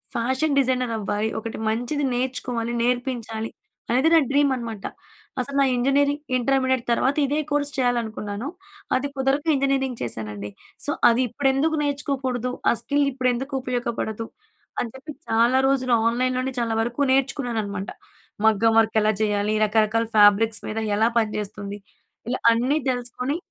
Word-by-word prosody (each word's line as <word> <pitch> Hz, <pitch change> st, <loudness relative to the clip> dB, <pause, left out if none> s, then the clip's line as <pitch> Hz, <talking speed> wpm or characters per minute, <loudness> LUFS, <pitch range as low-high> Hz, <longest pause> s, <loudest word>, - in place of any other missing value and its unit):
Fashion 260 Hz, +5 st, 0 dB
designer 255 Hz, -3 st, +1 dB
అవ్వాలి, 210 Hz, +1 st, -1 dB
ఒకటి 225 Hz, +1 st, -6 dB
మంచిది 245 Hz, +6 st, -1 dB
నేర్చుకోవాలి, 245 Hz, -2 st, -2 dB
నేర్పించాలి 240 Hz, -3 st, -2 dB, 0.4 s
అనేది 260 Hz, +7 st, +3 dB
నా 330 Hz, -, +8 dB
డ్రీమ్ 285 Hz, 0 st, +3 dB
అనమాట. 225 Hz, -4 st, -6 dB, 0.6 s
అసలు 280 Hz, +3 st, -5 dB
నా 275 Hz, -, +5 dB
ఇంజనీరింగ్ 280 Hz, +3 st, +2 dB, 0.2 s
ఇంటర్మీడియట్ 260 Hz, 0 st, +1 dB
తర్వాత 265 Hz, +4 st, +2 dB
ఇదే 290 Hz, +2 st, 0 dB
కోర్స్ 290 Hz, 0 st, 0 dB
చేయాలనుకున్నాను. 235 Hz, -2 st, -1 dB, 0.5 s
అది 270 Hz, +2 st, 0 dB
కుదరక 270 Hz, +3 st, 0 dB
ఇంజనీరింగ్ 270 Hz, -2 st, 0 dB
చేశానండి. 105 Hz, -3 st, -5 dB, 0.4 s
సో -, -, -4 dB, 0.2 s
అది 235 Hz, +2 st, +2 dB
ఇప్పుడెందుకు 270 Hz, +6 st, +1 dB
నేర్చుకోకూడదు 270 Hz, -4 st, -2 dB, 0.2 s
ఆ -, -, +5 dB
స్కిల్ 285 Hz, 0 st, +1 dB
ఇప్పుడెందుకు 255 Hz, +1 st, -1 dB
ఉపయోగపడదు 235 Hz, -3 st, -3 dB, 0.6 s
అని 240 Hz, -, -3 dB
చెప్పి 300 Hz, +4 st, -9 dB, 0.2 s
చాలా 235 Hz, +3 st, +3 dB
రోజులు 255 Hz, -2 st, +1 dB
ఆన్‌లైన్‌లోనే 255 Hz, +2 st, 0 dB
చాలా 230 Hz, -1 st, 0 dB
వరకు 245 Hz, +4 st, 0 dB
నేర్చుకున్నాననమాట. 240 Hz, -7 st, -1 dB, 0.6 s
మగ్గం 220 Hz, +1 st, +4 dB
వర్క్ 220 Hz, 0 st, +2 dB
ఎలా 215 Hz, +1 st, +3 dB
చేయాలి, 210 Hz, 0 st, +1 dB
రకరకాల 220 Hz, +1 st, +2 dB
ఫ్యాబ్రిక్స్ 210 Hz, +2 st, +5 dB
మీద 220 Hz, +1 st, -3 dB, 0.2 s
ఎలా 220 Hz, +2 st, +3 dB
పనిచేస్తుంది, 205 Hz, -2 st, -4 dB, 0.5 s
ఇలా 255 Hz, -, -1 dB
అన్నీ 250 Hz, +6 st, +1 dB
తెలుసుకొని 250 Hz, +4 st, -2 dB
245 Hz, 130 wpm, -23 LUFS, 225-270 Hz, 0.6 s, నా